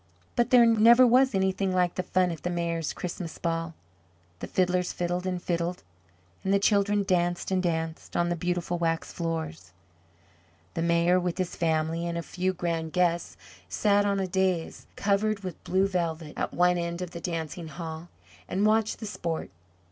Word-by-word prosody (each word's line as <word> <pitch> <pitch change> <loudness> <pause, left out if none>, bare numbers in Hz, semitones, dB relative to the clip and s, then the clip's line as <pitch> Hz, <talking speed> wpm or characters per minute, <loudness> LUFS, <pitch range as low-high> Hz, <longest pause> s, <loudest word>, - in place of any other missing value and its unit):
But 240 - +2
there 245 -2 +7
never 230 +2 +7
was 255 0 +4
anything 190 0 +1
like 180 -1 +2
the - - -1
fun 180 0 +1
at 165 - -6
the 175 - -2
Mayor's 170 -2 -1
Christmas 175 -1 -6
ball. 165 -1 -2 0.6
The - - -5
fiddlers 180 -1 +1
fiddled 175 +1 -2
and 180 -1 -1
fiddled, 175 0 -2 0.6
and 190 - 0
the 200 - +5
children 205 0 +2
danced 175 -2 0
and 185 -1 +2
danced 165 -2 -3
on 175 0 +2
the 175 - 0
beautiful 175 0 -2
waxed 165 -1 -1
floors. 160 - -4 1.0
The - - -2
Mayor, 170 +2 +3
with 180 -1 -2
his 185 -2 -2
family 165 +1 0
and 170 0 -2
a 170 - -3
few 185 +2 -1
grand 165 -3 -3
guests, 175 -1 +1 0.3
sat 205 -1 +3
on 200 -1 +1
a 190 - 0
dais 185 -2 -1
covered 205 +1 +1
with 185 -4 -7
blue 190 +1 +2
velvet 165 -4 -2
at - - -2
one 180 0 +3
end 170 +1 -3
of 175 - -7
the 170 - -7
dancing 165 -1 -4
hall, 160 +1 -7 0.4
and 195 +3 +1
watched 220 +1 +2
the - - -4
sport. 170 - -4
175 Hz, 175 wpm, -27 LUFS, 170-190 Hz, 1.0 s, there